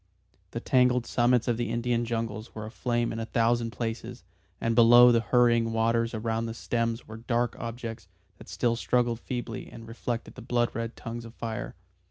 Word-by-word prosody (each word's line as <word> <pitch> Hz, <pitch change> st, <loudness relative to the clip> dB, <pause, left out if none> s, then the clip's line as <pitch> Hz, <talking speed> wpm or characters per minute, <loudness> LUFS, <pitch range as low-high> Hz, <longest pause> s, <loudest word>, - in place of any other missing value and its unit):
The -, -, -4 dB
tangled 125 Hz, -1 st, +3 dB
summits 120 Hz, 0 st, +2 dB
of 120 Hz, -2 st, +1 dB
the 120 Hz, -, -2 dB
Indian 120 Hz, 0 st, 0 dB
jungles 115 Hz, -1 st, -4 dB
were 110 Hz, -1 st, -5 dB
aflame 120 Hz, +1 st, -1 dB
in 110 Hz, -, -4 dB
a 115 Hz, -, -2 dB
thousand 115 Hz, 0 st, +1 dB
places, 115 Hz, +1 st, -5 dB, 0.4 s
and 115 Hz, -, 0 dB
below 120 Hz, +1 st, +8 dB
the 115 Hz, -, +4 dB
hurrying 115 Hz, -2 st, +3 dB
waters 115 Hz, +1 st, +1 dB
around 115 Hz, +1 st, -1 dB
the 115 Hz, -, -5 dB
stems 115 Hz, 0 st, -2 dB
were 110 Hz, -, -8 dB
dark 120 Hz, +1 st, -1 dB
objects 115 Hz, -3 st, -6 dB, 0.3 s
that -, -, -13 dB
still 115 Hz, +6 st, 0 dB
struggled 120 Hz, -1 st, +1 dB
feebly 120 Hz, -3 st, -5 dB
and 115 Hz, -1 st, -11 dB
reflected 115 Hz, +1 st, -4 dB
the 125 Hz, -, -10 dB
blood 120 Hz, 0 st, 0 dB
red 115 Hz, 0 st, -4 dB
tongues 120 Hz, -1 st, -6 dB
of 115 Hz, 0 st, -11 dB
fire. 115 Hz, -2 st, -5 dB
115 Hz, 180 wpm, -28 LUFS, 115-120 Hz, 0.4 s, below